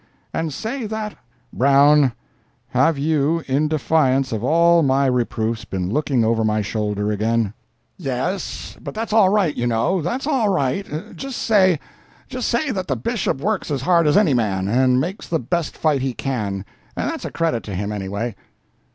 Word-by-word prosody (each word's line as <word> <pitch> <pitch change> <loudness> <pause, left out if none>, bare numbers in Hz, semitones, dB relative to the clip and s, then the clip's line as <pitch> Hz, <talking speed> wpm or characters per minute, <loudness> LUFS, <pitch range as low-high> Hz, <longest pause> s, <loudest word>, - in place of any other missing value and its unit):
"And 160 -1 -2
say 225 - -4
that—." 215 -1 -4 0.4
"Brown, 140 0 +5 0.6
have 165 -2 +2
you, 155 +2 +1
in 140 +3 +1
defiance 140 -3 +1
of 110 -1 -3
all 170 +4 +4
my 135 -1 +2
reproofs, 115 -3 0
been 95 -1 -3
looking 140 -4 +1
over 115 0 +2
my 110 -1 +1
shoulder 105 0 -2
again?" 110 0 0 0.5
"Yes, 150 +6 -3
but - - -7
that's 220 0 -3
all 215 -4 +6
right, 195 -7 +2
you 120 - -1
know—that's 175 - 0
all 265 -8 +1
right. 155 0 -2
Just 270 -2 -5
say—just 200 - 0
say 260 +4 0
that 185 -5 -3
the 135 - 0
Bishop 135 - -2
works 210 +2 -1
as 140 -3 -2
hard 170 -2 +3
as 150 - +4
any 195 -9 +4
man, 100 -6 0
and 125 +3 +3
makes 180 +9 -4
the 165 - +1
best 165 +4 -2
fight 150 -4 +1
he 130 -1 -1
can—and 105 -8 -3 0.5
that's - - -6
a - - -3
credit 165 -9 0
to 100 - -5
him, 100 +3 -3
anyway." 100 +3 -3
140 Hz, 165 wpm, -21 LUFS, 115-175 Hz, 0.6 s, all